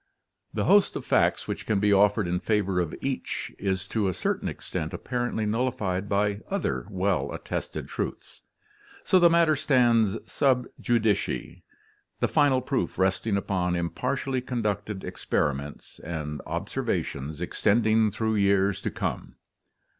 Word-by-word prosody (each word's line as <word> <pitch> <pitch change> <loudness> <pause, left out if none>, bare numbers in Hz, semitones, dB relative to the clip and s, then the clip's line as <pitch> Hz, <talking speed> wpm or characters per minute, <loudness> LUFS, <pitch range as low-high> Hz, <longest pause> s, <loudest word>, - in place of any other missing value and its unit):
The - - -1
host 205 -1 +4
of - - -5
facts - - +2
which - - -5
can 105 -3 +2
be 105 0 +3
offered 100 0 +4
in 90 +1 0
favor 100 -2 +1
of 85 -3 -2
each 135 -1 -3
is 95 -2 -1
to 110 -3 0
a 95 - -1
certain - - -1
extent 80 - -5
appar 120 -1 -2
ently 110 -1 -1
nullified 105 -5 -1
by 100 0 +1
other 200 +1 -2
well 95 -1 0
attested - - -5
truths. - - -5 0.6
So 185 - +4
the 175 -1 +7
matter 165 -2 +4
stands 120 -7 +3
sub 130 -3 +2
judice, 110 -4 +2 0.9
the - - +2
final 135 -3 +3
proof 130 +1 -2
resting 95 +2 +1
upon 90 -3 0
impartially 125 +9 -1
conducted 105 -5 -3
ex - - -8
periments 70 0 -2
and 75 -2 -5
observations 70 +3 -3
extending 110 +4 +2
through 110 +1 -1
years 100 -1 +2
to - - -1
come. - - -4
105 Hz, 140 wpm, -27 LUFS, 95-125 Hz, 0.9 s, the